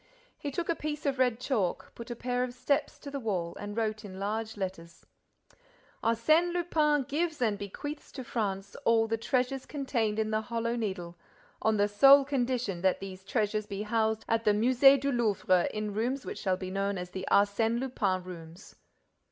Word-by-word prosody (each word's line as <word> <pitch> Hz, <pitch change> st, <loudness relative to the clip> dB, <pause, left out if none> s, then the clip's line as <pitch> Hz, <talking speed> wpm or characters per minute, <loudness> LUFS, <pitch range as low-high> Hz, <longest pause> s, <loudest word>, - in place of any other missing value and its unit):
He 290 Hz, -, -3 dB
took 335 Hz, +5 st, -3 dB
a 335 Hz, -, +2 dB
piece 300 Hz, -1 st, -5 dB
of 270 Hz, -2 st, 0 dB
red 250 Hz, -3 st, +2 dB
chalk, 240 Hz, -8 st, -1 dB
put 235 Hz, +1 st, -9 dB
a 240 Hz, -, -4 dB
pair 245 Hz, +1 st, -1 dB
of 245 Hz, -1 st, -5 dB
steps 280 Hz, +3 st, 0 dB
to 285 Hz, -, -8 dB
the 280 Hz, -, -3 dB
wall 185 Hz, -8 st, -2 dB
and 205 Hz, +1 st, -6 dB
wrote, 215 Hz, -1 st, -1 dB
in 190 Hz, -2 st, -9 dB
large 215 Hz, +2 st, -3 dB
letters: 185 Hz, -4 st, -6 dB, 1.0 s
Arsène 310 Hz, +10 st, +3 dB
Lupin 310 Hz, -4 st, +2 dB
gives 310 Hz, +4 st, -2 dB
and 225 Hz, -4 st, +1 dB
bequeaths 205 Hz, +9 st, -7 dB
to 260 Hz, -, -6 dB
France 200 Hz, -5 st, -3 dB
all 225 Hz, -1 st, +4 dB
the 225 Hz, -, 0 dB
treasures 255 Hz, +2 st, -1 dB
contained 240 Hz, -7 st, -1 dB
in 220 Hz, 0 st, 0 dB
the 215 Hz, 0 st, +1 dB
Hollow 230 Hz, +1 st, -2 dB
Needle, 190 Hz, -7 st, -4 dB, 0.4 s
on 220 Hz, -1 st, +2 dB
the 205 Hz, 0 st, +3 dB
sole 275 Hz, +7 st, +7 dB
condition 250 Hz, -8 st, -1 dB
that 190 Hz, 0 st, +2 dB
these 190 Hz, -1 st, -8 dB
treasures 210 Hz, 0 st, -1 dB
be 200 Hz, 0 st, -4 dB
housed 220 Hz, 0 st, 0 dB
at 225 Hz, 0 st, +1 dB
the 210 Hz, -, +4 dB
Musée 255 Hz, +5 st, +6 dB
du 280 Hz, +1 st, 0 dB
Louvre 205 Hz, -7 st, +2 dB
in 215 Hz, -1 st, -3 dB
rooms 245 Hz, +6 st, -1 dB
which -, -, -5 dB
shall 185 Hz, -2 st, 0 dB
be 185 Hz, 0 st, -6 dB
known 195 Hz, 0 st, -1 dB
as 180 Hz, 0 st, -6 dB
the 190 Hz, 0 st, -5 dB
Arsène 220 Hz, +3 st, +3 dB
Lupin 205 Hz, -8 st, -1 dB
Rooms. 170 Hz, 0 st, -11 dB
225 Hz, 185 wpm, -30 LUFS, 200-260 Hz, 1.0 s, sole